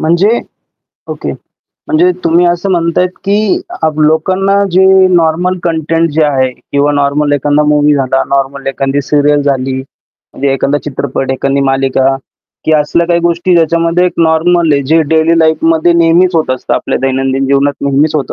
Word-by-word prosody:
म्हणजे 180 +9 +1 0.7
ओके. - - -5 0.5
म्हणजे 175 +4 +2
तुम्ही 170 +2 +2
असं 175 +3 -1
म्हणताय, 170 0 +1
की 200 +3 -1 0.2
अ, 160 - +3
लोकांना 185 +6 +1
जे 190 +2 +4 0.3
नॉर्मल 175 +2 +1
कंटेंट 165 0 -1
जे 155 +1 +1
आहे 135 -3 0 0.2
किंवा 145 +1 +1
नॉर्मल 145 +1 0
एखादा 145 +1 +1
मूव्ही 150 0 +3
झाला, 135 -1 0
नॉर्मल 140 0 -3
एखादी 135 +1 -2
सीरियल 145 +1 +1
झाली. 135 -2 -1 0.6
म्हणजे 140 0 -1
एखादा 140 +2 -1
चित्रपट, 135 -1 -3
एखादी 135 +1 -1
मालिका 135 0 0 0.5
की 160 - +1
असल्या 155 +3 +1
काही 170 0 +1
गोष्टी 170 +1 0
ज्याच्यामध्ये 170 +1 +1
एक 180 - -2
नॉर्मल 165 0 +2
आहे, 140 -1 +1
जे 160 +5 +2
डेली 160 +1 +2
लाईफमध्ये 160 +1 +2
नेहमीच 170 +2 +2
होत 160 -4 0
असतं, 130 - -3
आपल्या - - -2
दैनंदिन 135 0 -1
जीवनात 140 +1 +1
नेहमीच 140 +2 +1
होत 145 -3 -2
155 Hz, 155 wpm, -11 LUFS, 140-170 Hz, 0.7 s, जे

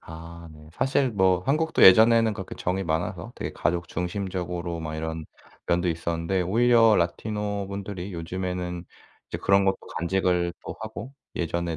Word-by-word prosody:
아 85 +1 -10
네. 75 0 -15
사실 130 - +1
뭐 95 -4 +3
한국도 160 +3 +1
예전에는 110 +3 +7
그렇게 95 -3 -7
정이 95 +2 -2
많아서 80 +1 -2
되게 - - -5
가족 85 0 -1
중심적으로 90 -2 -3
막 80 -1 -5
이런 80 0 -4 0.4
면도 90 +1 +1
있었는데 85 +2 -1
오히려 115 +3 +5
라티노 105 +3 -2
분들이 100 -1 -6
요즘에는 90 +1 -4 0.4
이제 - - -4
그런 100 0 +3
것도 95 0 +2 0.2
간직을 90 0 +1
또 - - -6
하고 110 +3 -7 0.2
예전에 85 0 -2
90 Hz, 335 characters per minute, -26 LUFS, 85-100 Hz, 0.4 s, 예전에는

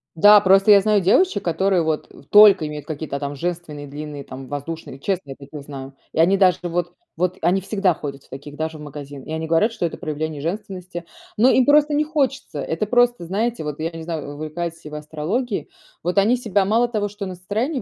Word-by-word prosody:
Да. 205 +5 +8
Просто 195 +2 +5
я 200 -1 +8
знаю 210 -1 +2
девочек, 205 - +3
которые 180 +1 +1
вот 160 -1 -2 0.2
только 205 -6 +7
имеют 150 -1 -7
какие-то 150 -2 -5
там 145 0 -4
женственные, 160 -2 -5
длинные, 145 0 -7
там 130 0 -9
воздушные. 145 -1 -6
Честно, 180 -5 -3
я - - -7
таких 140 +1 -10
знаю. 135 -1 -9 0.2
И - - -3
они 190 +4 +5
даже 185 -2 +4
вот 175 0 -2 0.2
вот, 180 +2 0
они 185 +3 +2
всегда 195 -2 +1
ходят 140 -2 -7
в - - -25
таких, 145 +2 -9
даже 160 0 -4
в 150 - -11
магазин. 145 -2 -9
И - - -9
они 160 0 -3
говорят, 165 +8 +2
что 175 - -2
это 165 - -4
проявление 155 -1 -4
женственности. 185 0 -5 0.3
Но 245 +5 +5
им 260 - +4
просто 295 +1 +4
не 300 +1 +2
хочется. 275 - -1
Это 165 +6 -2
просто, 245 -4 +2
знаете, 220 +2 -2
вот 150 0 -5
я 165 - -2
не 165 -1 -8
знаю, 155 -3 -5
увлекаетесь 160 +2 -5
ли - - -7
вы 150 - -5
астрологией. 160 - -3 0.3
Вот 180 +4 -2
они 225 +6 +4
себя 205 -5 +1
мало 225 +5 +2
того, 210 -3 -2
что 205 0 -6
на 185 - -5
настроение 220 - -2
175 Hz, 210 wpm, -21 LUFS, 150-205 Hz, 0.3 s, Да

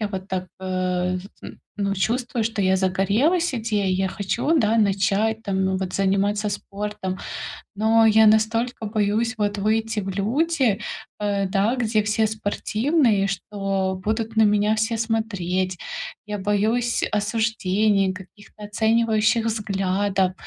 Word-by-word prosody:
я 215 - 0
вот 190 -1 -6
так, 185 -1 -3
э, 185 -1 -1
з 180 - -10 0.2
м, - - -9 0.2
ну, 200 -1 -1
чувствую, 235 +3 -1
что 220 -2 -1
я 190 0 +3
загорелась 205 - +1
идеей, 210 -5 0
я 190 +1 0
хочу, 230 - 0
да, 220 -3 +2
начать, 210 +2 +1
там, 190 -2 0
вот, 185 -1 -4
заниматься 200 +2 +1
спортом, 200 -2 -5 0.6
но 225 +2 +4
я 220 0 +6
настолько 225 +2 +2
боюсь, 215 +2 0
вот, 205 0 -1
выйти 220 +2 0
в 195 - -6
люди, 240 - +1 0.4
э, 200 -1 0
да, 200 +5 +1
где 220 -3 +1
все 215 +1 +2
спортивные, 220 +2 +1
что 195 -1 -2
будут 220 +1 -2
на 220 - +5
меня 210 0 +3
все 220 +1 0
смотреть. 190 -5 -1 0.5
Я 210 -1 -4
боюсь 215 +4 0
осуждения, 210 -2 +1
каких-то 205 +3 -13
оценивающих 220 +1 +2
взглядов, 195 -3 0
210 Hz, 130 wpm, -23 LUFS, 195-225 Hz, 0.6 s, я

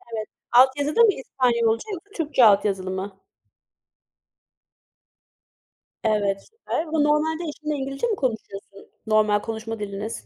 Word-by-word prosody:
Evet. 215 -1 -4 0.2
Alt 255 +2 +7
yazıda 295 +10 +1
mı 440 -3 +6
İspanyolca 235 - 0
yoksa 375 +3 -9
Türkçe 295 -7 +3
altyazılı 195 -2 +3
mı? 190 +1 -5 2.8
Evet, 205 -3 0
süper 450 -7 -3
ama 315 0 -2
normalde 310 +3 +1
eşinle 300 0 -4
İngilizce 275 - -3
mi 435 - 0
konuşuyorsun, 210 - -5 0.2
normal 215 -1 +3
konuşma 225 0 -6
diliniz? 205 +2 -5
235 Hz, 115 wpm, -23 LUFS, 210-300 Hz, 2.8 s, Alt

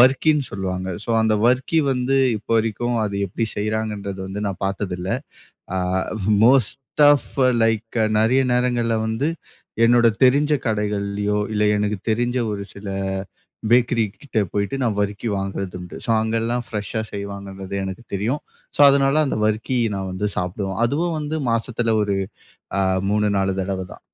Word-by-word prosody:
வர்க்கின்னு 135 +3 +4
சொல்லுவாங்க. 95 -1 -3 0.2
ஸோ - - -2
அந்த 110 -1 +3
வர்க்கி 130 +6 +2
வந்து 130 +1 +1 0.2
இப்ப 105 - -12
வரைக்கும் 115 +2 -1
அது 100 - -5
எப்படி 115 +6 -2
செய்கிறாங்கன்றது 105 -2 -2
வந்து 100 +2 -5
நான் 100 0 -6
பார்த்ததில்லை. 95 +1 -2 0.6
அ - - +1 0.7
மோஸ்ட் 130 +3 +2
ஆஃப் 145 - -1 0.3
லைக் 115 +1 0 0.2
நெறைய 125 +5 +3
நேரங்கள்ல 120 -2 +1
வந்து 110 +6 -1 0.6
என்னோட 120 0 +5 0.2
தெரிஞ்ச 145 +4 +4
கடைகள்ல்லியோ, 105 -1 -1
இல்ல 105 0 +1
எனக்கு 105 0 0
தெரிஞ்ச 120 +3 0
ஒரு 100 -1 -3
சில 100 +1 -10 0.8
பேக்கரி 120 -1 +4 0.2
கிட்ட 140 -6 -2
போய்ட்டு 100 +6 -1
நான் 115 -5 0
வர்க்கி 100 +3 -2
வாங்குறது 95 -1 -4
உண்டு. 90 -1 -9
ஸோ - - -1
அங்கெல்லாம் 115 +2 -1
ஃப்ரெஷ்ஷா 105 +1 -3
செய்வாங்கன்றது 100 -1 -6
எனக்கு 95 +4 -6
தெரியும். 115 +9 -1 0.3
ஸோ - - -3
அதனால 140 +2 +3
அந்த 135 - -1
வர்க்கி 110 +4 0 0.2
நான் 95 -1 -4
வந்து 105 +3 -1
சாப்பிடுவோம். 95 +2 -3
அதுவும் 160 +6 -1
வந்து 150 +1 -2
மாசத்தில 115 0 0
ஒரு 100 -1 0 0.6
அ - - +3 0.3
3 105 0 +2
4 95 0 +1
தடவை 95 0 -3
தான். - - -15
110 Hz, 145 wpm, -22 LUFS, 100-120 Hz, 0.8 s, என்னோட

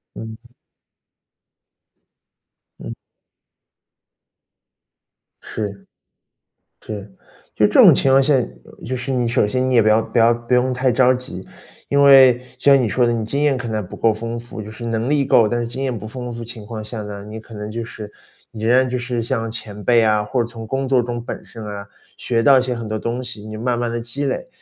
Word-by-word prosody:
嗯。 110 +2 -10 2.3
嗯。 - - -7 2.5
是。 100 -3 -6 1.0
是， 105 -2 -6 0.5
就 - - +2
这 - - -4
种 - - +8
情 135 - +1
况 135 +1 +6
下， 140 +2 +3 0.5
就 130 - -3
是 125 +2 -4
你 125 -2 0
首 115 -3 +2
先 130 +4 -1
你 - - +1
也 115 - +6
不 - - -1
要 110 +1 +4
不 120 - -2
要 115 +1 +5
不 120 +1 -7
用 125 +1 +3
太 130 +1 +1
着 125 +1 +4
急。 125 -8 -8 0.4
因 140 0 +3
为 135 -3 +7 0.2
像 140 +1 +5
你 120 - 0
说 125 +3 +2
的 120 - +1
你 115 -2 -2
经 140 +6 -2
验 145 -2 +3
可 125 -2 -5
能 110 -3 -3
不 - - -10
够 115 - +2
丰 115 +2 -5
富， 120 -1 -9
就 105 - -8
是 110 +2 -9
能 115 +1 -1
力 145 -1 +2
够， 120 -4 +4
但 120 +3 -1
是 120 - -2
经 130 +4 -5
验 130 -3 -2
不 110 - -8
丰 125 +1 -6
富 120 - -7
的 - - -5
情 115 -2 -10
况 110 0 -6
下 110 0 -6
呢， 100 -1 -8
你 105 +1 -8
可 110 +1 -13
能 105 0 -6
就 115 +1 -4
是 110 -2 -9 0.4
你 110 -1 -7
仍 120 +2 +4
然 130 0 +3
就 125 - -1
是 120 -1 -3
像 115 -1 -2
前 105 -2 -8
辈 120 +1 +4
啊， 105 -1 +2
或 125 +4 -1
者 - - -3
从 115 -1 -9
工 135 +3 -2
作 130 -1 +3
中 120 -1 -5
本 - - -7
身 115 -2 -10
啊， 100 -1 -7 0.3
学 115 -2 -1
到 135 +1 +6
一 - - +2
些 125 -1 -2
很 115 -2 -6
多 110 0 -2
东 120 +3 -3
西， 120 -4 -8
你 110 0 -7
慢 120 +2 -1
慢 120 -1 -1
地 120 - -2
积 120 +5 -4
累， - - -3
120 Hz, 230 characters per minute, -20 LUFS, 110-125 Hz, 2.5 s, 种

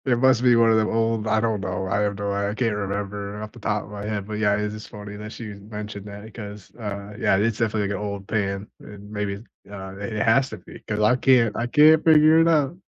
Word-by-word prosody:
It 125 -3 +2
must 130 -1 +4
be 125 -1 +5
one 115 -1 +5
of 110 - +4
them 110 -1 +2
old 115 -1 0
I 110 0 +2
don't 110 -3 0
know. 95 0 -3
I 100 +2 0
have 105 -1 0
no 100 -1 -2
I 100 0 -1
I - - -3
can't 115 -3 0
remember 100 0 -4
off 105 - -8
the 120 - -14
top 105 -1 -1
of - - -13
my 100 -1 -7
head. 105 -2 -3
But, 105 -1 -4
yeah, 105 -1 +3
it 105 - -1
is 110 0 -9
funny 105 -1 -9
that 105 +1 -8
she 110 -3 -7
mentioned 105 0 -8
that 105 +2 -10
'cause, 105 -3 -9
uh, 105 -2 -6
yeah, 95 - +3
it's 110 +2 0
definitely, 110 -3 0
like, 100 - -2
an - - -6
old 100 -1 -5
pan. 100 -2 -2
And 105 0 -12
maybe, 105 0 -3 0.3
uh, 95 -1 -8
it 100 +2 -5
has 130 +4 +3
to - - -6
be - - -13
'cause 105 -1 -2
I 105 +4 +4
can't 125 -5 +3
I 120 - -1
can't 155 +4 +6
figure 155 0 +6
it 165 - +4
out. 155 -2 +2
105 Hz, 260 wpm, -23 LUFS, 100-115 Hz, 0.3 s, can't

